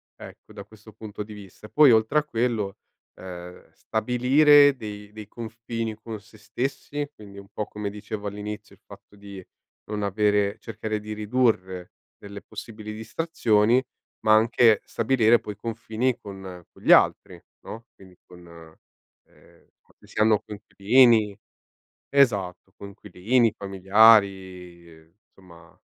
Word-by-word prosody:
ecco, - - -14
da - - -10
questo 110 -1 -17
punto 105 -1 -9
di 105 - -12
vista. 105 +1 -13
Poi 150 -3 +6
oltre 110 +6 +3
a 150 - -4
quello, 115 -7 -2 0.4
ehm, 90 -1 -10
stabilire 135 +5 +4
dei 105 -3 -9
dei 105 -1 -11
confini 115 0 -6
con 110 0 -9
sé 110 +1 -20
stessi, 135 +6 -4
quindi 100 -4 -14
un 100 0 -12
po' 105 - -3
come 105 -1 -5
dicevo 105 0 -7
all'inizio 105 +1 -7
il - - -37
fatto 105 - -16
di 100 -2 -11 0.5
non 105 -1 -3
avere 105 0 +1
cercare 110 -1 -5
di 105 +1 -7
ridurre 105 -5 -1 0.3
delle 100 0 -11
possibili 105 0 -9
distrazioni, 110 -1 +1 0.4
ma 110 - +4
anche 115 0 +4
stabilire 115 -1 +2
poi 105 - -8
confini 115 +2 -3
con 95 -3 -10
con - - -21
gli - - +2
altri, - - +3 0.3
no, 115 +1 -9
quindi 95 -2 -18
con 90 -1 -16 0.8
ehm, - - -25
quando - - -25
si - - -8
hanno 110 -1 +4
coinquilini 105 +1 +2 0.7
esatto 100 -9 +1
coinquilini, 105 +4 -1
familiari, 95 -5 +1 0.2
insomma 85 -3 -19
105 Hz, 130 wpm, -24 LUFS, 100-115 Hz, 0.8 s, Poi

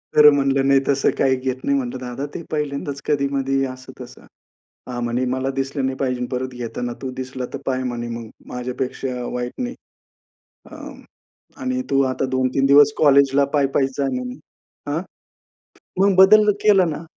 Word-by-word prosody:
तर 150 0 +9
म्हणलं, 135 -1 +1
नाही 135 0 +5
तसं 140 -1 +2
काही 135 -1 +3
घेत 130 0 -4
नाही 140 0 +2
म्हटलं 125 -1 -3
दादा, 125 +3 -5
ते 170 - -5
पहिल्यांदाच 145 -2 -3
कधी-मधी, 135 -1 0
असं-तसं. 130 -1 -10 0.7
हां, 120 -1 -4
म्हणे, 120 +2 -1
"मला 130 +1 -1
दिसलं 135 0 -1
नाही 130 0 -2
पाहिजे 125 -2 -1
परत 130 0 -3
घेताना 120 0 -4
तू. 130 - -3
दिसला 130 -1 -5
तर - - -2
पाय" 130 -1 0
म्हणे, 120 -1 -4
"मग. 115 -1 -6 0.2
माझ्यापेक्षा 125 0 -4
वाईट 125 0 -3
नाही." 245 +1 -3 1.0
अ, - - -10 0.9
आणि 255 0 -1
तू 135 0 +3
आता 135 - -2
2-3 130 +1 +1
दिवस 145 +1 +6
कॉलेजला 140 -1 +5
पायी-पायीच 135 -1 +2
जाय 140 -1 +1
म्हणे. 125 +2 -5 0.5
अ? 160 - 0 1.0
मग 195 -1 +4
बदललं 210 +2 +7
केलं 195 -5 +4
ना. 155 +2 -5
135 Hz, 155 wpm, -21 LUFS, 125-140 Hz, 1.0 s, तर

